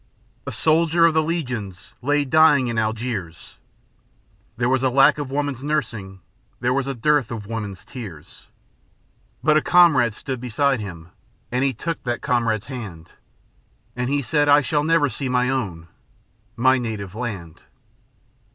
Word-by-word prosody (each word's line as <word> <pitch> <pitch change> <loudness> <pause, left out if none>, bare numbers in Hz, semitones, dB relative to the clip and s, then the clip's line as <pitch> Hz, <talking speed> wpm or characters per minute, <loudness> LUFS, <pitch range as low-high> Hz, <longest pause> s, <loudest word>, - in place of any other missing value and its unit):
"A - - -2
soldier 165 +6 +3
of 165 - +4
the 160 - +3
Legion 125 - -3 0.3
lay 145 +2 +1
dying 150 -1 +5
in 115 -1 -1
Algiers, 110 -6 -4 1.0
There 120 0 +1
was 130 0 +2
a 130 - +2
lack 135 +3 +4
of 145 -3 -4
woman's 140 -2 -2
nursing, 110 -11 -3 0.4
there 125 +1 +1
was 135 0 -1
dearth 135 0 +1
of 110 -3 -6
woman's 105 -3 -6
tears; 100 - -10 1.0
But 155 0 +4
a - - +3
comrade 145 -12 +4
stood 130 0 -5
beside 135 +2 +1
him, 85 -5 -8 0.4
and 125 +2 0
he 135 -1 +1
took 165 +7 -4
that 120 -1 -3
comrade's 115 -4 0
hand, 100 - -8 0.8
And 125 +1 -2
he 140 0 0
said: 145 +2 +1
'I 145 +1 +7
shall 145 +3 0
never 165 -1 +3
see 135 0 -4
my 125 +1 +1
own, 95 -11 -3 0.7
my 130 +2 +3
native 105 -6 -5
land.'" 100 -9 -6
125 Hz, 150 wpm, -22 LUFS, 110-145 Hz, 1.0 s, I